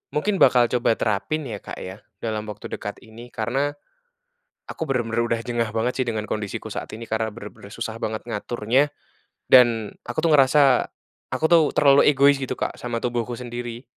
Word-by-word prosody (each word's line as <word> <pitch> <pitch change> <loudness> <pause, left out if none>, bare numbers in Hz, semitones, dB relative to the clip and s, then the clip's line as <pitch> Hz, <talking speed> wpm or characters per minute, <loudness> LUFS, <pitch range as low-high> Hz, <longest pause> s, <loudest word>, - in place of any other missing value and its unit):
mungkin 195 +6 0
bakal 120 -1 +5
coba 120 -2 +2
terapin, 115 +9 -1
ya, 105 -4 -5
Kak, - - -8
ya, 95 +2 -8 0.2
dalam 110 -1 -3
waktu 105 -1 -7
dekat 105 - -6
ini. 115 +1 -12
Karena, 135 +6 -1 1.0
aku - - -4
benar-benar 115 -3 0
udah 115 -1 -1
jengah 120 -2 -1
banget 120 +4 -1
sih, - - -4
dengan 110 -2 -2
kondisi 105 -2 -3
ku - - -8
saat - - -5
ini, 115 - -8
karena 110 0 -1
benar-benar 105 -2 -11
susah 115 -1 -5
banget, 110 0 -3
ngaturnya. 120 +5 0 0.6
Dan, 120 -4 +5 0.2
aku 120 - -6
tuh, 165 - +3
ngerasa, 135 -2 +5 0.5
aku - - -3
tuh, 170 -2 +7
terlalu 140 -1 +6
egois 140 +1 +5
gitu, 135 -2 -3
Kak, - - -3
sama 120 -1 -3
tubuhku 120 0 -2
sendiri. 120 0 -6
120 Hz, 175 wpm, -23 LUFS, 110-130 Hz, 1.0 s, tuh